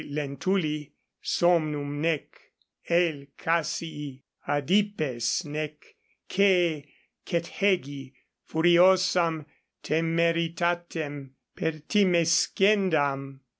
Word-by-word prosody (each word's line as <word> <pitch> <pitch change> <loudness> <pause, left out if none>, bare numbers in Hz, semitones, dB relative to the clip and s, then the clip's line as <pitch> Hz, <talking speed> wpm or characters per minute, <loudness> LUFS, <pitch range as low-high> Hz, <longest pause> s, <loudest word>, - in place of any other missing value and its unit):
Lentuli 150 +2 -2 0.3
somnum 150 -4 0
nec 160 -2 0 0.7
L. 165 -5 +1
Cassii 150 -4 -3 0.2
adipes 155 - 0
nec 150 0 -4 0.5
C. 175 -7 +2 0.3
Cethegi 170 -6 -1 0.3
furiosam 175 -1 +3 0.4
temeritatem 165 -3 -1 0.2
pertimescendam. 165 -4 +1
160 Hz, 55 wpm, -26 LUFS, 145-175 Hz, 0.7 s, furiosam